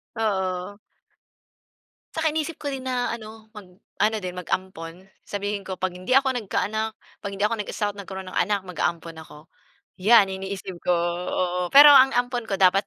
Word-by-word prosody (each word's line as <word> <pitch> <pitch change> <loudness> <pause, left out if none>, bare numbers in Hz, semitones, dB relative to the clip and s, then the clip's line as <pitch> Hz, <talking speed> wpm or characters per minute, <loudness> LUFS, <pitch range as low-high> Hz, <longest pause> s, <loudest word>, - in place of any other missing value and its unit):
Oo. 190 -3 -2 1.4
'Saka 320 0 0
inisip 315 +1 -3
ko 290 - -4
din 265 -1 -5
na 250 -2 -1
ano 220 -1 -12
mag 205 -3 -10 0.3
ano 220 +1 +3
din 180 0 -5
mag-ampon 175 -2 -4 0.3
sabihin 205 0 -3
ko 190 - -4
pag 185 0 -2
hindi 185 +7 -6
ako 270 0 +4
nagka-anak, 220 0 -2 0.3
pag 200 - -4
hindi 195 - -3
ako 215 +2 +2
nag-asawa't 205 0 -3
nagkaroon 190 -1 -7
ng - - -4
anak 205 -2 -1
maga-ampon 170 -2 -3
ako. 150 - -14 0.7
Yan 215 -4 +7
iniisip 190 -1 -6
ko, 180 - +4 0.4
oo. 180 0 -1
Pero 290 +1 +11
ang 270 -1 +7
ampon 245 -1 -1
ko 195 - -1
dapat 195 +1 +4
205 Hz, 165 wpm, -24 LUFS, 185-230 Hz, 1.4 s, Pero